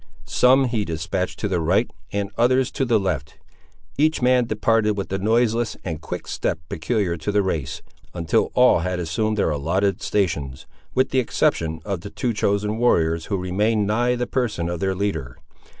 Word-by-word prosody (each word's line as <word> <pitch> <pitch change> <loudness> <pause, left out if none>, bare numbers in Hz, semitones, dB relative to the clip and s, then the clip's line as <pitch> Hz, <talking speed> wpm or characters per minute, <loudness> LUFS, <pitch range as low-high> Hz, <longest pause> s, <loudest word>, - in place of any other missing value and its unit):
Some 130 +2 +4
he 115 -4 -1
despatched 85 +2 -3
to 105 - 0
the 95 -3 0
right, 95 +9 +2 0.2
and 100 0 -2
others 130 +2 +2
to 135 - -1
the 115 -3 +3
left. 80 -7 -3 0.6
Each 155 +1 +3
man 125 -1 +3
departed 110 0 +2
with 100 - -3
the 95 - -2
noiseless 115 +1 +1
and 80 -4 -4
quick - - -6
step - - -1
peculiar 85 +1 -1
to 80 +6 -3
the 105 0 +2
race, 80 -5 -3 0.3
until 85 -3 0
all 125 -7 +5
had 90 +2 -2
assumed 105 +6 -1
their 90 - +2
allotted 90 +7 0
stations, 75 -10 -1 0.3
with 130 - +2
the 130 - +3
exception 80 -9 0
of 100 -4 -2 0.2
two 120 -2 -1
chosen 105 +1 0
warriors, 80 -9 +2
who 100 - -1
remained 105 +4 +1
nigh 120 +4 +1
the 125 0 -1
person 110 -10 -1
of 85 -1 -3
their 95 0 0
leader. 90 -11 -3
100 Hz, 175 wpm, -22 LUFS, 85-115 Hz, 0.6 s, all